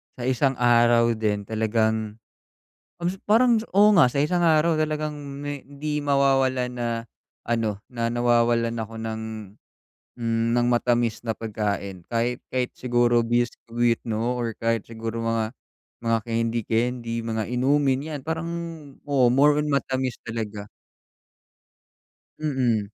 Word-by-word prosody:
sa 125 - -7
isang 130 +1 +1
araw 120 -1 +4
din 105 -2 -1
talagang, 110 0 0 0.8
kas 175 +2 -1
parang 230 +1 +4
oo 205 +2 +6
nga 160 -10 +6
sa 140 - -3
isang 175 +4 +1
araw 160 0 +4
talagang 155 -1 -1
me 145 -1 -6
hindi 150 +1 -4
mawawalan 135 -3 +2
na 120 -1 -2 0.6
ano, 115 -3 0
na 115 -2 -2
nawawalan 120 -1 +2
ako 115 +1 -8
ng, 110 0 -4 1.0
hmm, 115 0 +1
ng 120 0 +2
matamis 120 -1 +1
na 110 - 0
pagkain 100 -4 -4
kahit, 120 +1 -1
kahit 125 -1 -1
siguro 120 -1 +2
biscuit 120 0 0
'no, 115 +3 -1
or 115 -2 -2
kahit 115 -1 -1
siguro 115 0 -5
mga, 115 -1 -1 0.5
mga 115 -1 +1
kendi-kendi, 115 +1 -1
mga 110 -1 -2
inumin 135 +2 +2
yan, 145 - -4
parang 160 +3 -3 0.6
oo 140 -4 +2
more 145 +2 +5
on 150 - 0
matamis 130 -3 -1
talaga. 110 -3 -5 1.7
Mm. 130 -8 +1
120 Hz, 125 wpm, -24 LUFS, 115-140 Hz, 1.7 s, oo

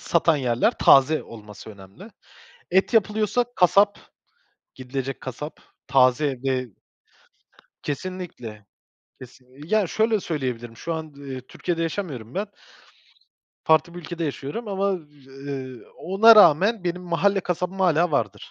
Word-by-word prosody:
satan 165 -2 +2
yerler 125 -3 0
taze 140 +3 +5
olması 105 -1 -12
önemli. 100 - -14 0.6
Et 190 +6 +2
yapılıyorsa 215 +2 +2
kasap, 200 +3 +4 0.8
gidilecek 130 +1 -5
kasap, 140 +4 -7 0.3
taze 130 +1 +3
ve 130 -1 -1 1.2
kesinlikle, 145 - -6 0.6
kesin 130 +2 -15
ya, 215 -1 +2
şöyle 220 +2 +1
söyleyebilirim 125 -9 -4
şu 165 - -4
an, 160 -2 -6
ııı, 135 -2 -7
Türkiye'de 165 +6 -4
yaşamıyorum 155 - -4
ben. 205 +2 -2 1.2
Farklı 160 +2 +3
bir 175 - -7
ülkede 170 0 -5
yaşıyorum 145 - -5
ama, 200 0 0 0.4
ııı, 135 -2 -8
ona 215 +6 +6
rağmen 195 +3 +5
benim 180 +1 -2
mahalle 195 +3 +1
kasabım 180 +1 -3
hâlâ 175 -2 +3
vardır. 105 -7 -2
155 Hz, 115 wpm, -23 LUFS, 130-190 Hz, 1.2 s, ona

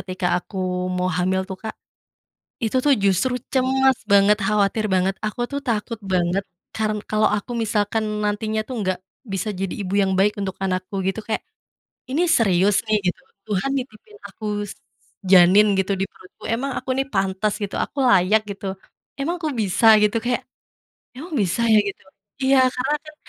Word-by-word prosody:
ketika 185 -1 -3
aku 195 - -13 0.4
mau 180 0 0
hamil 185 +2 0
tuh, 190 0 -7
Kak. 220 -1 -6 0.9
Itu 230 +2 0
tuh 285 - +6
justru 200 +7 +2 0.2
cemas 265 0 +3
banget, 200 +1 +6
khawatir 210 +1 +1
banget 190 +1 +2
aku 215 +3 -3
tuh 280 - -2
takut 230 0 -1 0.2
banget 180 +2 +1 0.3
karen 215 -1 -1
kalau 215 0 +2
aku 210 +4 -5
misalkan 210 0 0 0.2
nantinya 215 +1 -1
tuh 255 - -5
nggak 185 -2 -1 0.4
bisa 205 +3 -2
jadi 195 -1 -2
ibu 190 0 -4
yang 190 -1 +1
baik 210 +2 +3
untuk 190 -1 -2
anakku 185 +1 -2
gitu 195 +3 -1
kayak, 220 - -1 0.7
"Ini 290 +6 0
serius 200 - +3
nih?" 215 0 +3
gitu, - - -25 0.3
"Tuhan 205 +5 -1
nitipin 265 - -8
aku 215 - -10 0.9
janin 190 +3 +7
gitu 190 +1 0
di - - +1
perutku? 185 - -19
Emang 260 +5 -1
aku - - -11
nih 270 +1 0
pantas 195 +1 0
gitu? 195 - -4
Aku - - -10
layak 200 +1 +4
gitu? 200 0 -8 0.5
Emang 320 +6 -1
kok 310 -2 -1
bisa?" 200 +3 0 0.2
gitu, 210 +1 +2
kayak, 245 0 0 0.8
"Emang 315 +8 -8
bisa 185 +4 -1
ya?" 220 -1 +6
Gitu. 200 -1 -6 0.4
Iya 265 0 +4
karena 265 +4 -1
kan 305 0 -12
210 Hz, 165 wpm, -22 LUFS, 190-240 Hz, 0.9 s, janin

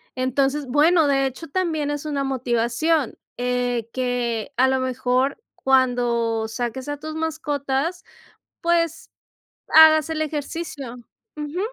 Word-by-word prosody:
Entonces, 270 +2 0
bueno, 310 +4 +4
de 275 -1 +2
hecho 265 +5 -8
también 315 -4 -1
es 290 +1 -4
una 285 -2 -1
motivación, 255 +3 0 0.2
eh, 245 -2 -1
que 245 -2 -2
a 260 +1 +5
lo 265 0 +1
mejor 255 - 0
cuando 240 -4 +1
saques 240 +4 -4
a 290 - -3
tus 310 +2 -7
mascotas, 315 +1 -2 0.6
pues 335 -1 0 0.6
hagas 315 0 +7
el 315 -1 -2
ejercicio. 295 -4 -4 0.4
Ujú. 300 +4 -4
275 Hz, 120 wpm, -23 LUFS, 250-310 Hz, 0.6 s, hagas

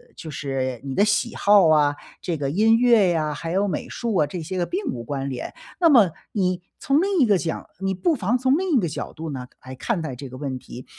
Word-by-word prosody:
就 160 - -9
是 135 -4 -3
你 135 -1 -4
的 200 - +3
喜 210 +3 +1
好 200 -3 +5
啊， 145 -2 +4 0.3
这 170 -3 -2
个 140 -1 -2
音 220 +7 +4
乐 230 -5 +5
呀， 155 -3 0
还 165 +3 -6
有 195 +3 +1
美 190 - -3
术 235 -2 -3
啊， 150 -5 +3
这 170 +3 -6
些 185 +3 -4
个 175 - +1
并 385 +3 -3
无 120 - -6
关 135 +2 -4
联。 130 -2 -5 0.2
那 340 -2 +5
么， 225 - +6 0.2
你 185 -3 0 0.2
从 280 +3 +2
另 390 -1 +1
一 270 - +6
个 210 -3 +4
讲， 165 -2 -4
你 195 0 -1
不 330 - +1
妨 235 -2 0
从 260 +4 +2
另 365 -6 +1
一 - - +5
个 175 - 0
角 150 - -5
度 160 -1 -6
呢， 125 -2 -6 0.2
来 130 - -8
看 170 - -2
待 140 -5 -4
这 135 +2 -8
个 130 - -9
问 135 -2 -4
题。 125 0 -11
180 Hz, 270 characters per minute, -23 LUFS, 145-225 Hz, 0.3 s, 么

